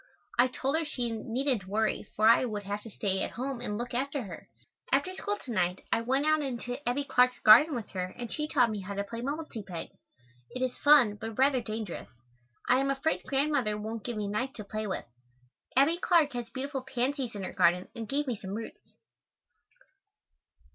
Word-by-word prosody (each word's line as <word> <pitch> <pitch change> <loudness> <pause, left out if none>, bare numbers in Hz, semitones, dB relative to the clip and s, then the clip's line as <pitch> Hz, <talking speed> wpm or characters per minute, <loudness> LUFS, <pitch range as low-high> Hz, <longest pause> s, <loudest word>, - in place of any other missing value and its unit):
I 250 - +7
told 270 +3 -1
her - - 0
she 245 -6 -2
needn't 230 -1 -1
worry 215 +1 0
for 215 +1 +4
I 230 - +6
would 210 -4 -3
have 205 +1 -4
to 225 - -10
stay 195 -2 -1
at - - -1
home 255 0 -4
and 210 -4 -3
look 240 +1 -4
after 275 +2 -1
her. 180 -6 -9 0.4
After 280 +8 +2
school 410 +2 -2
to 250 - -6
night 180 -3 0
I - - +2
went 265 +5 +1
out 310 0 +3
into 250 -2 -4
Abbie 275 +4 0
Clark's 250 -3 +3
garden 255 +8 +7
with 230 -4 -5
her 185 -1 -2
and 240 -1 -5
she 300 0 -2
taught 250 -7 +3
me 210 - -3
how 200 +1 -6
to 200 - -1
play 230 +3 -6
"mumble 295 +5 -3
te 230 -7 -7
peg." 180 -4 -7 0.7
It 255 - -1
is 255 -1 -1
fun, 265 -8 +5
but 225 -1 -5
rather 265 -1 +4
dangerous. 215 -5 -5 0.6
I 250 - +5
am 275 0 +1
afraid 275 +4 0
Grandmother 270 -6 +2
won't 220 +1 -5
give 240 -3 -3
me 210 - -2
a - - -3
knife 255 +6 -2
to 210 - -7
play 215 +1 -4
with. 190 - -3 0.7
Abbie 300 +5 +5
Clark 325 -6 +3
has 240 -1 -4
beautiful 270 +2 -4
pansies 260 -1 -2
in 200 - -5
her - - -5
garden 180 0 +3
and 225 -2 -6
gave 290 +2 0
me 250 -4 -1
some 195 -1 -6
roots. 225 +1 -9
245 Hz, 210 wpm, -29 LUFS, 215-275 Hz, 0.7 s, I